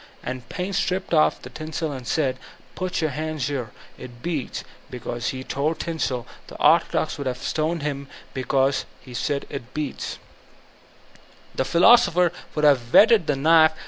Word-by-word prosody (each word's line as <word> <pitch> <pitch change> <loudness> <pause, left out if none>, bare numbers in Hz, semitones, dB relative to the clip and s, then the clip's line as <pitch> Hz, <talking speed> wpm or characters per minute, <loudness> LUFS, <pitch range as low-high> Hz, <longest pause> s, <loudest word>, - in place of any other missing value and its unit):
And 130 0 -6
Paine 185 +2 -3
stripped 185 -1 -1
off 155 -2 +3
the 125 - -9
tinsel 155 +2 -4
and 130 -3 -7
said, 130 -5 0 0.4
''Put 185 -2 -2
your 155 -2 0
hand 155 +1 -4
here, 125 -3 -2 0.2
— - - -24
^it 120 -1 -11
beats"; 160 -7 -3
and - - -18 0.2
because 120 -1 -4
he 130 0 -3
tore 145 +5 -1
the - - -23
tinsel, 140 -7 -2 0.2
the - - -11
orthodox - - +3
would 140 - -3
have 125 -1 -2
stoned 160 +3 -1
him; 140 -2 -3
and - - -18
because 135 +1 +1
he 130 - -13
said 140 +3 -1
"it 125 -3 -7
beats," 150 -2 -4 1.4
the - - -2
philosofAers 180 - +5 0.2
would 150 -1 +2
have 125 -5 +3
whetted 215 -6 +6
the 145 - +2
knife. 160 +3 +5
145 Hz, 175 wpm, -24 LUFS, 130-160 Hz, 1.4 s, whetted